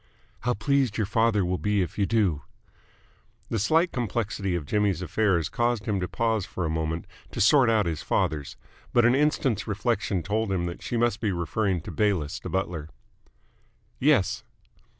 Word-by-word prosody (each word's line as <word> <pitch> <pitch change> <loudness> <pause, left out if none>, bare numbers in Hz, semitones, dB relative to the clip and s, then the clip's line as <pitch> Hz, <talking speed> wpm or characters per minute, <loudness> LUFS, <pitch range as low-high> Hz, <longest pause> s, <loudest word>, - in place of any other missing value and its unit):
"How 125 0 0
pleased 135 0 +1
your 110 - +1
father 110 -1 +2
will 90 +1 -1
be 105 -2 +1
if 90 - -6
you 100 - +2
do!" 100 -10 +1 1.1
The 115 - 0
slight 160 - +3
complexity 105 -5 -2
of 85 -4 -3
Jimmy's 100 0 0
affairs 90 -5 +1
caused 120 +2 0
him 100 -3 0
to 90 - -2
pause 115 -1 0
for 90 -1 -4
a 80 - -1
moment 80 +1 -2 0.2
to - - -7
sort 125 +4 +5
out 110 -3 +3
his 80 -2 -2
fathers, 75 -3 -1 0.4
but 120 -1 +5
an 120 - +5
instant's 135 -6 +1
reflection 100 -3 -1
told 105 +1 -1
him 90 -2 0
that 85 0 -5
she 120 - -3
must 120 -2 +1
be 105 -4 +1
referring 90 +1 -1
to - - -8
Bayliss 95 -5 0
the - - -7
butler. 85 -5 -3 1.1
"Yes." 115 -7 +2
105 Hz, 170 wpm, -26 LUFS, 90-115 Hz, 1.1 s, sort